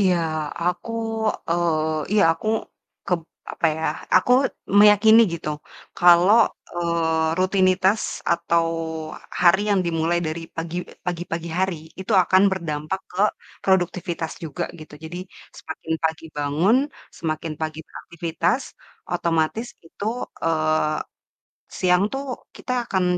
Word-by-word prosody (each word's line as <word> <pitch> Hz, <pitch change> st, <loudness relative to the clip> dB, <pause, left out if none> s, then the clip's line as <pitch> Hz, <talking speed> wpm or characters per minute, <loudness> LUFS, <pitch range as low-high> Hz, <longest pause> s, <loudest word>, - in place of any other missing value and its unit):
Iya, 185 Hz, -3 st, +4 dB, 0.5 s
aku 180 Hz, +5 st, -1 dB, 0.6 s
eee, 160 Hz, -3 st, 0 dB
iya, 210 Hz, -, +5 dB
aku 190 Hz, +6 st, -5 dB, 0.6 s
kep 180 Hz, -3 st, +1 dB, 0.3 s
apa -, -, +1 dB
ya, 160 Hz, -, -5 dB, 0.3 s
aku 215 Hz, +7 st, +4 dB, 0.5 s
meyakini 210 Hz, +2 st, +7 dB
gitu, 155 Hz, -2 st, -5 dB, 0.5 s
kalau, 175 Hz, +4 st, +7 dB, 0.4 s
eee, 165 Hz, -2 st, 0 dB
rutinitas, 185 Hz, +2 st, +3 dB, 0.3 s
atau 170 Hz, 0 st, +1 dB, 0.8 s
hari 180 Hz, +3 st, +6 dB
yang 200 Hz, -, +3 dB
dimulai 165 Hz, +1 st, +1 dB
dari 160 Hz, +2 st, -3 dB, 0.2 s
pagi 165 Hz, +1 st, -4 dB, 0.3 s
pagi-pagi 170 Hz, -1 st, -3 dB
hari, 190 Hz, -2 st, +1 dB, 0.2 s
itu 190 Hz, -, -3 dB
akan 190 Hz, +1 st, +4 dB
berdampak 165 Hz, -1 st, -3 dB
ke 185 Hz, -, -3 dB, 0.4 s
produktivitas 175 Hz, -3 st, 0 dB
juga 165 Hz, +2 st, -3 dB
gitu. 155 Hz, -1 st, -11 dB
Jadi 165 Hz, +2 st, -7 dB, 0.4 s
semakin 160 Hz, 0 st, -6 dB
pagi 160 Hz, 0 st, 0 dB
bangun, 150 Hz, -, +2 dB, 0.4 s
semakin 155 Hz, 0 st, -3 dB
pagi 155 Hz, 0 st, -3 dB
beraktivitas, 170 Hz, -, -2 dB, 0.5 s
otomatis 170 Hz, +6 st, 0 dB, 0.2 s
itu, 200 Hz, -, -8 dB, 0.4 s
eee, 155 Hz, -1 st, +1 dB, 0.8 s
siang 180 Hz, 0 st, +3 dB
tuh 270 Hz, +1 st, -3 dB, 0.3 s
kita 250 Hz, -, -5 dB, 0.2 s
akan 190 Hz, -1 st, +1 dB
170 Hz, 110 wpm, -23 LUFS, 160-185 Hz, 0.8 s, meyakini